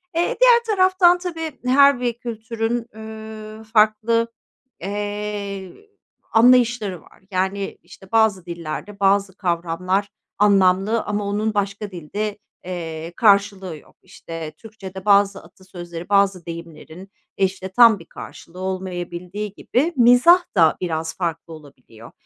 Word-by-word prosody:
Eee, 340 +1 0
diğer 480 -1 +6
taraftan, 370 -2 +4
tabii, 330 -4 -6
her 280 0 +5
bir 245 -1 -1
kültürün, 230 0 -4
üüü, 220 0 -9
farklı, 220 +1 +2 0.5
eee, 205 -1 -4 0.6
anlayışları 235 -6 +3
var. - - -22
Yani, 190 +2 -2
işte, 190 +1 -16
bazı 220 -5 +2
dillerde 170 +4 -7
bazı 195 -1 +2
kavramlar 180 +2 -1 0.3
anlamlı 200 +2 +3
ama 210 0 -3
onun 210 +2 -1
başka 200 0 -3
dilde, 200 +5 -4 0.3
eee, 165 -2 -6
karşılığı 200 -5 +2
yok. - - -20
İşte, 165 -2 -8
Türkçede 195 -3 -10
bazı 200 -1 +3
atasözleri, 175 -3 -10
bazı 200 -3 +2
deyimlerin, 170 +2 -10 0.3
işte, 190 -1 -1
tam 230 -1 +6
bir 165 - -13
karşılığı 170 +2 -11
olmayabildiği 185 +1 -5
gibi 300 +11 -1
mizah 250 +9 +6
da 165 -3 +4
biraz 160 -2 -3
farklı 165 -2 -4
olabiliyor. 130 -7 -15
200 Hz, 115 wpm, -21 LUFS, 180-220 Hz, 0.6 s, diğer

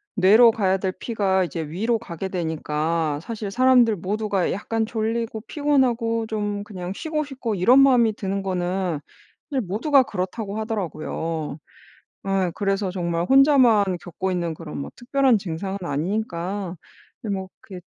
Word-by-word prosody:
뇌로 220 +4 +7
가야 195 -4 +1
될 190 0 -2
피가 195 -5 0
이제 170 -2 -4
위로 220 +9 0
가게 190 -3 -6
되니까 160 -3 -1
사실 215 0 -5
사람들 250 -1 +4
모두가 200 +1 -1
약간 220 +3 -2
졸리고 225 0 -2
피곤하고 245 -5 +1
좀 205 -2 -2
그냥 185 -3 -6
쉬고 310 +2 -2
싶고 260 -6 -4
이런 235 +9 +5
마음이 250 -5 +5
드는 195 -2 -3
거는 180 -3 -1 0.5
사실 270 -3 0
모두가 245 - +3
그렇다고 200 0 -4
하더라고요. 165 -7 -3 0.7
예 190 -2 +1
그래서 195 -1 -1
정말 170 -2 -1
혼자만 265 -5 +5 0.2
겪고 185 +2 -4
있는 170 -2 -1
그런 155 -1 -8
뭐 140 - -6
특별한 260 -1 +2
증상은 190 +1 -4
아니니까 180 +3 -3 0.5
그게 210 -3 -2
뭐 190 -1 -4
그게 185 -2 -10
200 Hz, 315 characters per minute, -23 LUFS, 180-230 Hz, 0.7 s, 뇌로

